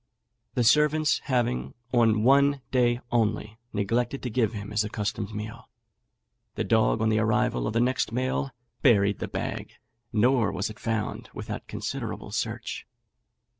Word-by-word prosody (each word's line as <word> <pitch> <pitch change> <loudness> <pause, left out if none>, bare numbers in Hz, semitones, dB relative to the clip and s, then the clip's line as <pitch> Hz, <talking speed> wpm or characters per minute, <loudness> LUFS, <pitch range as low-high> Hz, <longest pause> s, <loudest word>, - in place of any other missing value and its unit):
The 125 - +2
servants 150 +5 +4
having, 65 - 0 0.2
on 110 -3 +4
one 140 +2 +4
day 120 -1 +2
only, 110 -1 0
neglected 115 +6 -1
to 125 - -3
give 115 -1 +2
him 105 -1 -6
his 105 0 +1
accustomed 105 0 -3
meal, 110 +2 -7 0.9
the - - -1
dog - - +2
on 110 - +3
the 110 0 +2
arrival 110 - +1
of - - -2
the 115 - +2
next 125 -2 +1
mail 130 +3 -1 0.3
buried 100 -7 +4
the - - -3
bag, - - -4 0.4
nor 120 +1 +3
was 100 +3 -2
it 110 - -13
found 110 -2 -3
without - - -6
considerable - - -5
search. - - -3
115 Hz, 145 wpm, -27 LUFS, 105-125 Hz, 0.9 s, servants